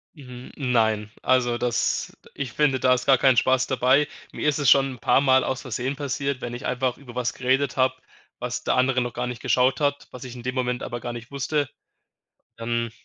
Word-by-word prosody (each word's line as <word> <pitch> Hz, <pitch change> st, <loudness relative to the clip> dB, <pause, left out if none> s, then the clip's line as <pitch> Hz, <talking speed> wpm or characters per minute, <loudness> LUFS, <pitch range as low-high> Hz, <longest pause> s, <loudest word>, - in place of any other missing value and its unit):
Hm, 125 Hz, -3 st, -11 dB
nein, 110 Hz, -5 st, +1 dB
also, 125 Hz, -2 st, +2 dB
das 120 Hz, -1 st, -1 dB, 0.2 s
ich 130 Hz, -4 st, -5 dB
finde, 145 Hz, -3 st, +2 dB
da 130 Hz, 0 st, +4 dB
ist 125 Hz, 0 st, -1 dB
gar 135 Hz, -2 st, +6 dB
keinen 130 Hz, -2 st, +4 dB
Spaß 130 Hz, +2 st, +3 dB
dabei. 130 Hz, +3 st, +3 dB, 0.2 s
Mir -, -, -3 dB
ist 150 Hz, -, +2 dB
es 145 Hz, -4 st, +3 dB
schon 135 Hz, 0 st, +5 dB
'n 125 Hz, -, -13 dB
paarmal 130 Hz, -1 st, +4 dB
aus 130 Hz, -1 st, -2 dB
versehen 130 Hz, +2 st, -3 dB
passiert, 140 Hz, -1 st, -3 dB
wenn 120 Hz, 0 st, -5 dB
ich 120 Hz, -, -7 dB
einfach 125 Hz, 0 st, -1 dB
über 130 Hz, -4 st, -12 dB
etwas 125 Hz, 0 st, -2 dB
geredet 130 Hz, +2 st, 0 dB
habe, 130 Hz, 0 st, +2 dB, 0.4 s
was 125 Hz, 0 st, -4 dB
der -, -, +1 dB
andere 130 Hz, 0 st, +2 dB
noch 120 Hz, -1 st, -3 dB
gar 125 Hz, +1 st, -3 dB
nicht 125 Hz, -1 st, -6 dB
geschaut 130 Hz, +3 st, +2 dB
hat, 145 Hz, -1 st, -1 dB
was 125 Hz, -, -9 dB
ich 125 Hz, -1 st, -8 dB
in 120 Hz, -, -9 dB
dem 130 Hz, +1 st, -3 dB
Moment 125 Hz, -1 st, -1 dB
aber 120 Hz, 0 st, -4 dB
gar 120 Hz, -, -5 dB
nicht 120 Hz, +3 st, -9 dB
wusste. 140 Hz, +1 st, -1 dB, 0.9 s
Ähm, 115 Hz, 0 st, -2 dB
130 Hz, 210 wpm, -24 LUFS, 120-135 Hz, 0.9 s, gar